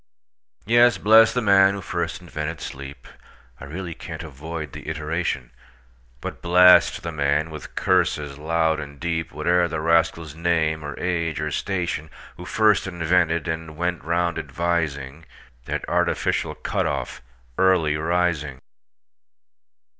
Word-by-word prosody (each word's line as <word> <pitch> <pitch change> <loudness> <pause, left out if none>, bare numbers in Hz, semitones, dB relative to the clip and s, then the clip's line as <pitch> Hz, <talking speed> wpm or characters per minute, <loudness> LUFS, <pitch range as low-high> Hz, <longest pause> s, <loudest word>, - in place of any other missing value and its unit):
Yes; 120 +3 +5
bless 110 +1 +6
the 125 - -1
man 100 -1 +5
who 100 - -6
first 85 -1 -3
invented 80 -2 -5
sleep(I 65 -1 -11
really 85 +4 -6
can't - - -8
avoid 75 0 -7
the - - -7
iteration),But 65 -6 -6
blast 90 +1 +5
the 85 - -3
man, 75 +1 0
with 75 - -9
curses 75 -6 0
loud 80 0 +1
and 70 -1 -9
deep, 80 0 -2
Whate'er 85 +4 +1
the 80 -1 -3
rascal's 80 -1 +1
name, 80 -1 0
or 75 -1 -6
age, 85 -4 -1
or 75 0 -2
station, 85 -3 -2 0.3
Who - - -10
first 105 -3 +2
invented, 85 -1 +1
and 80 -1 -5
went 85 -1 -2
round 85 +1 0
advising, 80 -4 -3 0.4
That - - -3
artificial - - 0
cut - - -2
off, - - -4 0.4
Early 90 -5 +3
Rising! 80 -4 -1
80 Hz, 125 wpm, -23 LUFS, 75-90 Hz, 0.4 s, bless